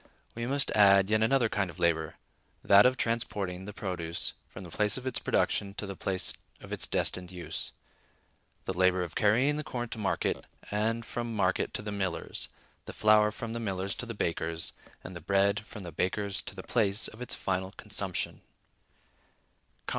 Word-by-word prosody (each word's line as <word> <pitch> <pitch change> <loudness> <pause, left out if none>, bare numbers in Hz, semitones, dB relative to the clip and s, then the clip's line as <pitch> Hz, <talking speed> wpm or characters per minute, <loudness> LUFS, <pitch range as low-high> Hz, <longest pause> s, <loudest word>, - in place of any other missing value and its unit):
We 115 +1 -3
must 140 +1 +1
add 100 -1 +6
yet 110 0 +4
another 120 +1 +4
kind 105 -3 0
of 85 - -10
labor; 85 -3 +1 0.5
that 100 +4 +8
of 130 0 +1
transporting 100 -5 -1
the 105 - -6
produce 90 -5 -2 0.2
from 95 - -9
the 85 - -9
place 105 +4 +2
of 130 - -6
its 130 - -1
production 100 -1 +1
to 105 - -4
the 100 -1 -5
place 95 -1 0 0.3
of - - -8
its - - 0
destined 90 0 -1
use: 90 -2 -5 0.9
the 95 - -1
labor 95 0 +3
of 85 -4 -6
carrying 125 - +3
the 150 - -2
corn 120 -4 -4
to 115 - -6
market, 100 -2 0 0.3
and 115 +2 0
from 120 -1 -4
market 95 -3 +1
to - - -3
the 105 - -4
miller's, 95 -4 -2 0.4
the - - -7
flour 105 0 +5
from 115 +1 -6
the 115 - -3
miller's 95 -3 -2
to 125 - -5
the 115 - -5
baker's, 85 -2 -2 0.3
and 90 - -8
the 85 - -7
bread 100 +3 +3
from 105 -1 -10
the 85 - -6
baker's 100 +4 -1
to - - -7
the - - -7
place 105 -2 +1
of 110 - -11
its 125 - -1
final 95 0 -2
consumption. 100 -4 -2
100 Hz, 185 wpm, -30 LUFS, 95-110 Hz, 0.9 s, that